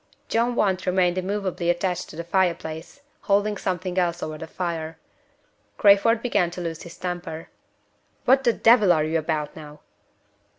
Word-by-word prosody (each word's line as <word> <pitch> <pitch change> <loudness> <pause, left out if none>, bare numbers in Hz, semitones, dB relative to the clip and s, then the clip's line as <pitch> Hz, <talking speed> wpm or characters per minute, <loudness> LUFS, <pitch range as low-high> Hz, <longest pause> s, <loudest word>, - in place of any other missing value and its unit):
John 235 +2 +1
Want 190 -4 0
remained 180 0 +2
immovably 185 -2 -2
attached 175 +1 -1
to - - -11
the 170 - -5
fire 180 0 +2
place, 160 - -9 0.2
holding 205 +1 +1
something 185 -1 -2
else 175 -1 -1
over 155 - -4
the 160 - -7
fire. 165 -2 -4 0.8
Crayford 210 +3 +5
began 205 -8 +1
to 180 +1 -7
lose 165 -2 -5
his 170 - -11
temper. 175 -3 -5 0.8
"What 265 +1 +4
the 240 - +4
devil 225 -5 +5
are 155 -3 +3
you 160 +1 0
about 155 -2 -3
now?" 150 -1 -11
180 Hz, 160 wpm, -24 LUFS, 165-200 Hz, 0.8 s, Crayford